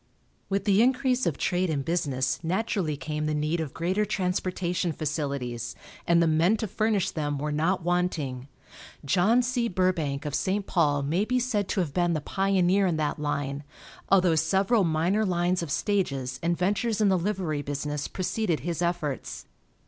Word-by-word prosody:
With 195 0 -1
the 200 +1 +4
increase 255 0 +2
of 160 - -1
trade 180 0 0
and 140 -4 -1
business 135 -6 0
naturally 180 -3 -1
came 150 +1 -3
the 155 - 0
need 150 +3 0
of 155 -4 -3
greater 185 +5 0
transportation 180 -3 -1
facilities, 140 -6 -3 0.3
and 170 0 +5
the - - +3
men 165 +7 +3
to 220 - -3
furnish 210 -1 0
them 145 -2 -2
were 150 +2 -2
not 165 +5 0
wanting. 165 -8 -1 0.6
John 200 - +3
C. 245 -1 0
Burbank 175 -7 0
of 145 - -3
St. 195 +5 0
Paul 145 -7 +1
may 165 +8 +1
be 250 +3 0
said 225 -6 0
to 195 - 0
have 155 -6 -3
been 175 -1 +1
the 155 - 0
pioneer 195 +2 +2
in 170 -3 0
that 150 -1 -1
line, 145 -1 -2 0.5
although 185 -3 +4
several 190 +7 +2
minor 170 +6 +1
lines 180 -2 +1
of 170 - -4
stages 135 -8 -1
and 170 0 0
ventures 210 +4 0
in 210 -2 +4
the 190 - +4
livery 175 -6 -1
business 145 +1 -3
preceded 185 -2 -1
his 170 -1 -3
efforts. 170 -6 -2
175 Hz, 170 wpm, -27 LUFS, 150-195 Hz, 0.6 s, and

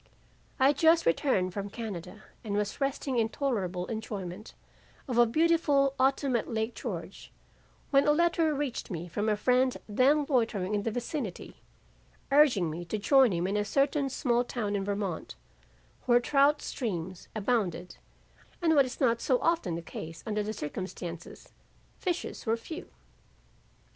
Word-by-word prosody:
"I 260 - +5
had 285 - +1
just 325 +1 +5
returned 185 - +1
from 200 +1 -4
Canada 205 -2 -7 0.2
and 205 -3 -3
was 210 +5 -2
resting 275 -2 0
in 225 -1 +1
tolerable 195 -11 -2
enjoyment 210 -3 -6 0.5
of 245 -3 0
a 240 - +8
very - - -7
beautiful 310 -3 +3
autumn 270 0 +2
at 235 - -1
Lake 220 +1 -2
George, 180 -6 -7 0.6
when 275 0 +4
a - - +6
letter 330 0 +2
reached 285 -4 -3
me 175 -3 -5
from 205 +6 -1
a 210 - +1
friend 250 +3 +2
then 270 +7 +3
loitering 225 -8 0
in 205 - +1
the 225 - -1
vicinity, 240 - -5 0.7
urging 255 - +4
me 170 +3 -5
to 175 - -3
join 260 +3 +5
him 175 0 -1
in 195 +2 -1
a 210 - +1
certain 275 +4 +1
small 245 -2 +1
town 215 -4 -3
in 195 - -1
Vermont 200 -4 -3 0.7
where 240 -1 +6
trout 280 +3 +3
streams 185 - -4
abounded 195 -5 -1 0.6
and 330 -2 +3
what 280 -3 +5
is 250 - -8
not 235 -4 +2
so 255 -3 +2
often 330 - 0
the 170 - -5
case 160 0 -8
under 210 -2 -1
the 210 +1 -3
circumstances, 175 -2 -7 0.5
fishers 355 - -3
were 225 +1 +2
few. 320 +8 -8
230 Hz, 160 wpm, -29 LUFS, 195-275 Hz, 0.7 s, a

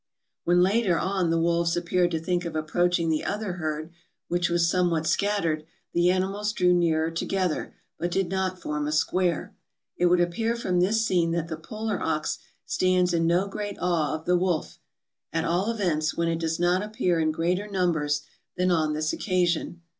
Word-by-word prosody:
When 175 +1 +4
later 195 -2 +2
on 190 -2 0
the 165 - +2
wolves 170 0 +1
appeared 175 +1 +1
to 165 -2 -1
think 175 +2 -1
of 170 -2 -5
approaching 170 +2 +1
the 155 - 0
other 205 -2 -2
herd, 155 +1 -3 0.4
which 175 0 +1
was 170 0 +2
somewhat 170 -2 +1
scattered, 170 -5 0 0.3
the 175 +1 +3
animals 195 +3 0
drew 180 -3 +3
nearer 165 -2 +2
together, 180 0 -2 0.2
but 175 - -1
did 190 +1 0
not 190 -1 -1
form 150 -2 -3
a - - -1
square. 170 +2 0 0.4
It 180 - +2
would 175 0 +4
appear 200 +7 0
from 185 -6 0
this 220 +5 +2
scene 170 -5 +2
that 170 -1 -2
the 160 - -3
polar 215 +6 -4
ox - - -1 0.3
stands 180 -1 +2
in 165 -1 +2
no 175 +4 +2
great 205 0 -5
awe 160 -5 +1
of 155 - -8
the 180 - +3
wolf; 180 -3 -1 0.5
at 165 +1 -1
all 180 +6 +1
events, 175 -8 0
when 170 0 +1
it 165 0 0
does 165 0 -1
not 175 +1 +2
appear 205 -5 0
in 155 -1 +2
greater 175 +6 -1
numbers 160 -7 0 0.3
than 180 0 +2
on 155 -3 +2
this 155 +1 -1
occasion. 175 -2 0
175 Hz, 185 wpm, -26 LUFS, 165-185 Hz, 0.5 s, When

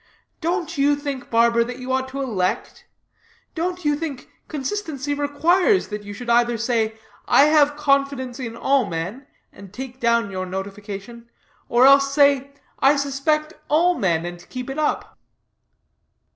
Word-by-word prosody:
Don't 340 -2 -2
you 290 +1 +4
think, 285 -3 -5
barber, 235 0 +4
that 245 +1 -7
you 255 0 -5
ought 260 0 0
to 275 +1 -4
elect? 190 -8 -2 0.7
Don't 355 +1 -3
you 295 0 +3
think 290 -4 -6 0.2
consistency 295 -2 -3
requires 335 +8 +2
that 210 -1 -5
you 205 0 -9
should 240 +4 -8
either 240 0 +3
say 225 -1 0 0.3
'I - - +6
have 295 -1 +4
confidence 275 -3 0
in 230 -2 -6
all 270 -1 +2
men,' 180 +11 -5 0.3
and 200 -2 -13
take 255 +3 -8
down 235 -3 +1
your 185 -1 -4
notification; 200 +4 -7 0.4
or 240 +2 +5
else 275 0 +6
say, 280 -1 +4 0.3
'I 275 +2 +5
suspect 280 +3 0 0.2
all 340 +4 +4
men,' 170 - 0
and 175 0 -8
keep 255 +1 -5
it 275 - -4
up." 305 - -2
265 Hz, 150 wpm, -22 LUFS, 230-290 Hz, 0.7 s, I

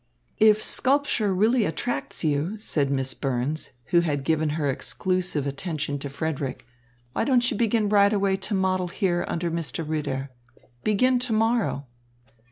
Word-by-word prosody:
"If 215 0 +5
sculpture 260 -6 +2
really 220 +6 +3
attracts 195 +6 -3
you," 155 +7 0
said 150 -9 0
Miss 135 -1 0
Burns, 135 +3 -2 0.2
who 175 - +6
had 145 -5 -1
given 155 +1 +1
her 150 -3 0
exclusive 180 +2 -1
attention 145 0 -3
to 140 - -5
Frederick, 140 -3 -4 0.5
"why - - 0
don't 250 -3 +3
you - - -2
begin 220 -1 +1
right 200 -1 +4
away 200 -2 +2
to 195 +2 -2
model 185 -1 +1
here 175 -1 0
under 170 0 -2
Mr. 165 -1 -3
Ritter? 140 -3 -3 0.5
Begin 250 +5 +3
to 245 -2 -1
morrow." 220 -9 +1
175 Hz, 150 wpm, -25 LUFS, 145-215 Hz, 0.5 s, who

